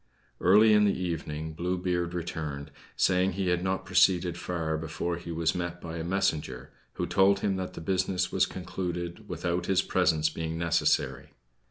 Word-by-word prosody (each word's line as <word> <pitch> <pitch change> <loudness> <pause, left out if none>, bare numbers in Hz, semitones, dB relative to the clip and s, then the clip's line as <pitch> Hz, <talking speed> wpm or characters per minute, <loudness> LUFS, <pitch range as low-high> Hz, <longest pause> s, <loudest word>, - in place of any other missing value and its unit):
Early 105 +4 +6
in 105 0 +5
the 100 - +1
evening 80 -3 -4
Blue 90 +3 -2
Beard 90 -1 -1
returned, 75 -4 -4 0.2
saying 90 0 +2
he 95 -1 -1
had 90 0 +1
not 95 0 -1
proceeded 90 -1 +3
far 85 -2 -2
before 80 +2 -3
he 85 0 -7
was 80 -1 0
met 85 -1 -4
by 85 -1 -6
a 80 - -3
messenger, 80 -8 -1 0.2
who - - -2
told 95 +1 +3
him 100 -2 +1
that 95 -1 -4
the - - -7
business 90 0 0
was - - +2
concluded 90 -1 -5
without 90 0 -2
his 95 0 +3
presence 80 0 +2
being 80 +1 -4
necessary. 85 0 0
90 Hz, 170 wpm, -28 LUFS, 80-95 Hz, 0.2 s, Early